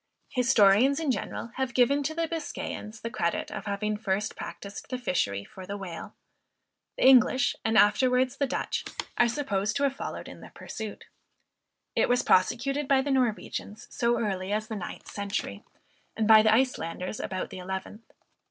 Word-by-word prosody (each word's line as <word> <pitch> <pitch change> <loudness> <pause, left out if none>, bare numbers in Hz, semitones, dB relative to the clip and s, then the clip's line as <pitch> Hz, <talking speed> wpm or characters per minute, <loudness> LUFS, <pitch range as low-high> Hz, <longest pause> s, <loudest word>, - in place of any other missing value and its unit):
Historians, 250 +1 +4
in 310 -4 +1
general, 230 0 -4
have 265 -2 -2
given 270 +3 +4
to 310 +3 -2
the 330 0 0
Biscayans 290 -9 -5
the 230 - -4
credit 170 -6 -1
of - - -6
having 210 +1 -1
first 210 0 -2
practiced 200 0 -8
the 255 - -2
fishery 135 - -1
for 185 -1 -11
the 200 - -4
Whale; 180 -4 -7 0.8
the - - +2
English, 260 0 +5
and 220 0 +2
afterwards 250 +4 +4
the 280 - +1
Dutch - - -2 0.4
are 240 - +6
supposed 220 -6 -1
to 280 - 0
have 275 -1 +1
followed - - -6
in - - -11
the - - -11
pursuit. 220 -2 -7 0.9
It - - +2
was 245 0 +3
prosecuted 265 +9 +2
by 270 -1 +4
the 285 - -1
Norwegians 220 -4 -1
so 235 0 +1
early 195 -3 -2
as 215 +1 -1
the 220 - -3
ninth 195 - -7
century, 200 0 -4 0.5
and 220 -1 +1
by 220 -1 +9
the 220 0 +4
Icelanders 215 -6 0
about 185 -1 -4
the - - -7
eleventh. 190 +4 -7
220 Hz, 170 wpm, -28 LUFS, 200-260 Hz, 0.9 s, by